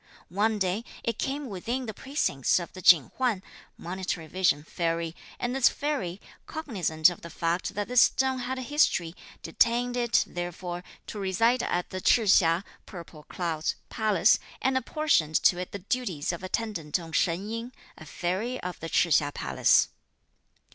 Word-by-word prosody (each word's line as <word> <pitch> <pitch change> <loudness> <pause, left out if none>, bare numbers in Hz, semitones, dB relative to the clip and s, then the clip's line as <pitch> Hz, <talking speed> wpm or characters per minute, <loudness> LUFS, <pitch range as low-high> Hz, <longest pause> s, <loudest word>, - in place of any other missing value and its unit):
One 210 +5 +1
day 190 +2 -1 0.2
it 230 -2 -2
came 280 +1 -2
within 235 +6 -3
the 220 - -5
precincts 265 - 0
of 170 - -8
the 185 - -9
Ching 165 -7 +6
Huan 240 -8 0 0.3
(Monitory 180 -1 -4
Vision) 175 -3 +1
Fairy; 165 0 -2 0.2
and 245 +1 -2
this 270 - +5
Fairy, 220 -12 -3 0.3
cognizant 180 - +1
of 175 - -10
the 170 - -9
fact 170 +2 -2
that 205 0 -2
this 250 0 +5
stone 265 -1 +2
had 255 +1 -3
a 260 - -4
history, 240 - +1 0.3
detained 240 +8 +1
it, 240 -1 +2
therefore, 175 0 -5 0.2
to 210 - -7
reside 225 +6 +2
at 175 0 -2
the 185 - -4
Ch'ih 225 +3 +4
Hsia 170 -2 +4 0.2
(purple 170 -5 -10
clouds) 165 -3 -2
palace, 215 -2 +3 0.2
and 265 0 +1
apportioned 260 - +1
to 175 - +4
it 180 - -5
the - - -4
duties 185 -6 -2
of 170 - -6
attendant 185 -5 -2
on 165 -1 -9
Shen 170 +4 0
Ying, 230 +2 -5 0.2
a 155 - -12
fairy 190 +11 -2
of 180 0 -6
the 165 - -6
Ch'ih 170 - +2
Hsia 145 0 +3
palace. 65 - +3
185 Hz, 165 wpm, -27 LUFS, 170-240 Hz, 0.3 s, Ching